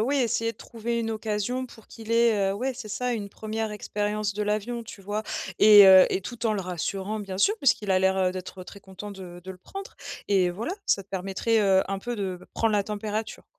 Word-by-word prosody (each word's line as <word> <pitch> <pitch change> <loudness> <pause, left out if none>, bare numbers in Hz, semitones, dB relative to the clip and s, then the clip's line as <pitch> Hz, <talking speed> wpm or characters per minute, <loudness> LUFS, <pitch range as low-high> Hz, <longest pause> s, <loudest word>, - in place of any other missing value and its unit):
oui, 275 +5 +1
essayer 230 -3 +1
de - - -29
trouver 235 0 -4
une 225 -1 -2
occasion 220 +3 -2
pour 230 -3 -14
qu'il 225 -1 -7
ait, 225 -4 +3
heu - - 0
ouais, 255 +5 -2
c'est 240 -3 -8
ça, 250 +4 -1
une 205 -3 -5
1re 220 +1 -4
expérience 210 0 -2
de 210 - -2
l'avion, 215 +3 -2
tu 210 - -11
vois? 205 +2 -3 0.4
Et, 210 -2 +9
heu 190 -1 +9
et - - 0
tout 235 +5 -7
en 225 - +2
le 205 - -1
rassurant, 190 +3 -3
bien 195 -3 -6
sûr, 410 - +4
puisqu'il 220 - +2
a 185 - +4
l'air 190 0 +2
d'être 185 0 -7
très 200 - -12
content 190 +2 -9
de 180 -3 -10
de 190 - -8
le 190 - -8
prendre, 390 - -9 0.3
et 190 -3 +3
voilà. 220 - -4
Ça 200 - +1
te 190 - -32
permettrait, 195 +4 0
heu, 190 -2 +4
un 195 0 -2
peu 240 +5 -4
de 190 -4 -3
prendre 225 -1 +1
la 205 - +3
température. 210 +1 -4
210 Hz, 225 wpm, -26 LUFS, 195-225 Hz, 0.4 s, Et